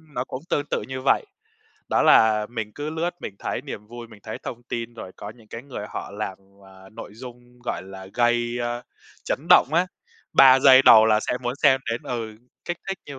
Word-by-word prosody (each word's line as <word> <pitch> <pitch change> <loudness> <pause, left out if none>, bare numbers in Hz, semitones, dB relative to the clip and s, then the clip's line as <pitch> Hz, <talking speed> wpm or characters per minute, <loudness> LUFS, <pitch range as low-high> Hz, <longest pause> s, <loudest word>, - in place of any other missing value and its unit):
nó 125 - -1
cũng 130 +1 -7
tương 145 - 0
tự - - -1
như 130 0 -5
vậy. - - +3 0.6
Đó - - +2
là 105 -1 +5
mình 110 -3 -5
cứ 145 +1 -5
lướt 165 +2 -2
mình 100 - -7
thấy - - -4
niềm 105 - -8
vui, 120 +1 -10
mình 105 -3 -16
thấy 110 - -7
thông 120 0 -7
tin 115 0 -5
rồi 95 -5 -9
có 100 - -8
những 110 -2 -18
cái 115 - -8
người 130 -7 -7
họ - - -6
làm, 100 -2 -5 0.3
à, 95 0 -16
nội - - -9
dung, 125 0 -12
gọi - - -3
là, 95 0 -10
gây, 120 0 +1
a, 120 0 -3 0.4
chấn - - -1
động - - +7
á, 180 +2 +3 0.5
3 130 0 +8
giây 135 -1 +8
đầu 110 -4 +8
là 110 -1 +3
sẽ - - -2
muốn 120 +1 -2
xem 135 -3 +5
đến 115 +6 -3
ừ, 115 -5 -5 0.3
kích 175 0 -4
thích 195 - -3
như 140 -2 -8
120 Hz, 220 wpm, -23 LUFS, 110-130 Hz, 0.6 s, 3